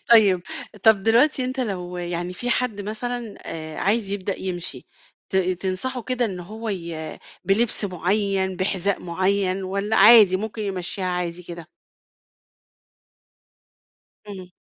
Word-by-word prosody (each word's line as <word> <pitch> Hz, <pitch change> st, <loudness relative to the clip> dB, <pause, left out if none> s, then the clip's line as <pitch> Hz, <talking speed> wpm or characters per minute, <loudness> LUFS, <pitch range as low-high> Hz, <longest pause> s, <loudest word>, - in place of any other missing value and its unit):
طيب. 200 Hz, -5 st, +6 dB, 0.4 s
طب، 220 Hz, -3 st, +5 dB
دلوقتي 255 Hz, +5 st, +4 dB
أنت 260 Hz, +1 st, -3 dB
لو 180 Hz, -6 st, -3 dB
يعني 175 Hz, 0 st, -3 dB
في 245 Hz, +7 st, -3 dB
حد 235 Hz, -4 st, 0 dB
مثلًا 225 Hz, +2 st, -4 dB
آآ، 155 Hz, -1 st, -6 dB
عايز 205 Hz, +1 st, +1 dB
يبدأ 200 Hz, -1 st, -3 dB
يمشي، 180 Hz, -2 st, -5 dB, 0.4 s
ت 190 Hz, -, 0 dB
تنصحه 190 Hz, +7 st, -1 dB
كده 250 Hz, +1 st, -1 dB
إن 190 Hz, -5 st, -3 dB
هو 220 Hz, +6 st, -7 dB
ي 170 Hz, -5 st, -5 dB, 0.3 s
بلبس 215 Hz, +2 st, +2 dB
معين، 190 Hz, +1 st, 0 dB
بحذاء 190 Hz, +1 st, 0 dB
معين، 185 Hz, +2 st, 0 dB
والّا 200 Hz, +3 st, -1 dB
عادي، 210 Hz, -2 st, +8 dB
ممكن 215 Hz, +2 st, -4 dB
يمشيها 190 Hz, -1 st, -3 dB
عادي 180 Hz, -1 st, -2 dB
كده؟ 170 Hz, -1 st, -9 dB, 2.6 s
إمم. 190 Hz, -3 st, -8 dB
195 Hz, 125 wpm, -23 LUFS, 180-220 Hz, 2.6 s, عادي